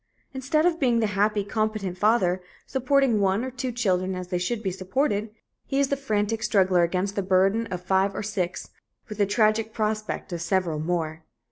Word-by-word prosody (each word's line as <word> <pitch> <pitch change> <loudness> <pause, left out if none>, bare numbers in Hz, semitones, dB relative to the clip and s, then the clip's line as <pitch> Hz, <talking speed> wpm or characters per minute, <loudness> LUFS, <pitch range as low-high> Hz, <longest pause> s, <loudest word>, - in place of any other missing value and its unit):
Instead 280 +4 +1
of 340 -2 +2
being 245 -4 +3
the 225 - +2
happy, 205 +1 +1
competent 215 -2 -2
father, 190 -2 +2 0.2
supporting 265 -2 +2
one 200 +4 +1
or 260 - -5
two 255 0 -3
children 190 -6 0
as 180 -1 -6
they 180 - 0
should 220 +5 -2
be 190 - -1
supported, 205 +4 -1 0.4
he 275 - 0
is 280 -1 +2
the 280 - +1
frantic 220 -4 -1
struggler 190 -5 +3
against 185 +4 0
the 200 - 0
burden 195 +4 +2
of 180 -2 -5
five 190 +1 +2
or - - -3
six, 190 -4 -3 0.4
with 210 0 -7
the 205 - +3
tragic 215 +1 +2
prospect 215 -3 -2
of 170 - -4
several 170 -3 0
more. 160 -1 -2
205 Hz, 190 wpm, -25 LUFS, 185-230 Hz, 0.4 s, being